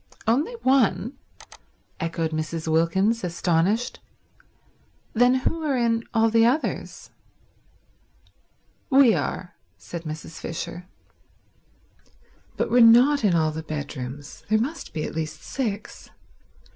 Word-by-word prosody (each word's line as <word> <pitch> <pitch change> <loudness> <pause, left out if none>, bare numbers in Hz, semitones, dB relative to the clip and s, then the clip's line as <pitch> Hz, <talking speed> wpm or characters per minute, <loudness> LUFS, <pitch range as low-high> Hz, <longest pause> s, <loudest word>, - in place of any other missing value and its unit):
"Only 270 - +1
one?" 245 -2 +2 0.8
echoed 165 -1 -2
Mrs. 155 +1 -4
Wilkins, 190 +8 +2
astonished. 180 +6 0 1.1
"Then 245 +2 +4
who 320 +5 -1
are 290 -4 0
in 230 -1 +1
all 225 -1 +2
the 225 0 +4
others?" 255 +7 -1 1.8
"We 265 -4 +6
are," 180 -3 -3 0.2
said 170 - -7
Mrs. 155 +1 -7
Fisher. 170 +2 -6 1.7
"But - - -1
we're 245 - +5
not 245 +5 +6
in 190 -5 +3
all 155 -1 +2
the 160 +1 -5
bedrooms. 145 -2 -7
There 215 - +4
must 280 +10 -3
be 155 - -4
at - - -5
least 155 0 -5
six. 220 -6 -5
205 Hz, 110 wpm, -24 LUFS, 160-245 Hz, 1.8 s, We